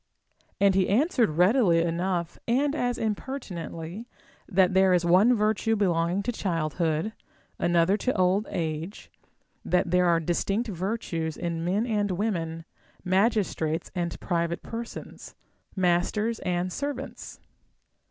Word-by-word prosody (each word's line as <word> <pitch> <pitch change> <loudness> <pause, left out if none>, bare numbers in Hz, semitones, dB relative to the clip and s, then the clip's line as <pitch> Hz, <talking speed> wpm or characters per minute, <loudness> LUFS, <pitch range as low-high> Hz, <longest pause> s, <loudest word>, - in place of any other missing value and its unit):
And 200 -1 +5
he 190 -1 +2
answered 250 - +3
readily 180 -3 +4
enough, 170 0 -2
and 275 +5 +2
as 245 -5 -1
impertinently, 205 - -5 0.4
that 185 -2 +3
there 190 -1 +5
is 175 -1 +1
one 195 +8 +5
virtue 220 +1 +1
belonging 180 -1 +1
to 245 - -1
childhood, 165 -1 -1 0.5
another 175 +3 +3
to 255 +4 -1
old 185 +3 +2
age; 160 +3 -4 0.5
that 180 -1 +1
there 180 0 +4
are 170 -1 +4
distinct 195 +7 -1
virtues 175 -4 -3
in 170 -1 -3
men 195 +6 0
and 210 -3 0
women, 170 -5 -2 0.4
magistrates 185 -5 0
and 175 -2 -3
private 170 -1 -1
persons, 230 0 -8 0.4
masters 190 +5 +1
and 180 0 -2
servants. 275 -1 -5
185 Hz, 120 wpm, -27 LUFS, 170-220 Hz, 0.5 s, And